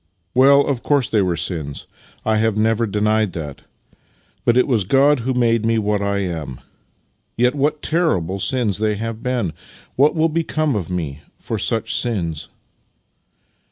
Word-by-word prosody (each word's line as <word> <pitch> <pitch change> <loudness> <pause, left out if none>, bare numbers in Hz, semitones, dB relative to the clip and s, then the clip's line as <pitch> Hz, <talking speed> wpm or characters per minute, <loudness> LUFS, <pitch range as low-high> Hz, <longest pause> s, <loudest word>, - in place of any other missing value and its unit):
" 85 - -47
Well, 140 +2 +6
of 135 -4 -1
course 140 -4 +1
they 110 -4 +2
were 90 -3 0
sins 80 -4 -4 0.2
— - - -29
I 110 0 +2
have 110 -1 +1
never 115 +1 +2
denied 105 -1 +1
that; 75 -4 -6 0.8
but 120 +1 +3
it 125 - +4
was 115 -7 +2
God 135 +7 +3
who 125 +2 -2
made 115 -2 +2
me 115 0 +2
what 105 -1 0
I 100 0 0
am. 80 -8 -5 0.8
Yet, 125 +1 +3
what 150 +1 -1
terrible 100 - 0
sins 105 0 0
they 105 -1 +1
have 115 +1 -5
been! 120 -9 -1 0.4
What 145 +5 +3
will 160 0 +3
become 155 -3 0
of 95 -5 -3
me 80 -6 -4 0.2
for - - -4
such - - 0
sins? 85 -10 -3
110 Hz, 165 wpm, -20 LUFS, 95-130 Hz, 0.8 s, Well